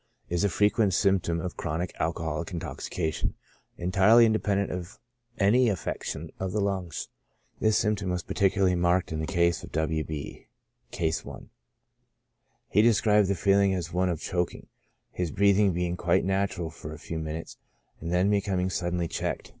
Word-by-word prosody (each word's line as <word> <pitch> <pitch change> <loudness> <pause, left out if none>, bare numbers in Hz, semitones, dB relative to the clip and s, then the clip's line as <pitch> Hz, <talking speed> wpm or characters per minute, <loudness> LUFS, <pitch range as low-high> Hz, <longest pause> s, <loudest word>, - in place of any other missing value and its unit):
Is 85 +2 0
a 100 - +3
frequent 105 +1 +2
symp 95 0 +3
tom 85 0 -2
of 90 +1 -4
chronic 85 +2 -3
alcoholic 80 0 -2
Intoxication, 80 -1 -3 0.4
entirely 95 +6 +5
Independent 105 -3 +1
of 90 +1 -6 0.4
any 115 +5 +4
affection 100 - -4
of 95 -1 -3
the 105 - 0
lungs. 95 -4 -2 0.5
This 110 -1 +3
symptom 105 -3 0
was 90 -2 -2
particu 95 -1 +1
larly 90 -1 +3
marked 90 0 +1
In 80 - -2
the 80 - -2
case 85 -1 +1
of - - -10
W. 80 0 0
B 75 -2 -7 0.2
— - - -48
,(Case 80 -1 -1
i.) - - -9 1.3
He 105 - +4
described 105 -2 +4
the 100 - +1
feeling 100 0 +3
as 85 -2 -4
one 90 +1 +1
of 85 -3 -2
choking, 90 0 -2 0.5
his 90 -2 -2
breathing 100 +3 +3
being 90 0 -1
quite 85 0 +1
natural 95 -3 -1
for 75 0 -9
a - - -8
few 80 +2 -5
minutes, 80 +1 -6 0.4
and 85 +1 -5
then 90 +3 +3
becoming 95 -2 0
suddenly 85 -1 -1
checked. - - -3
90 Hz, 165 wpm, -27 LUFS, 85-100 Hz, 1.3 s, entirely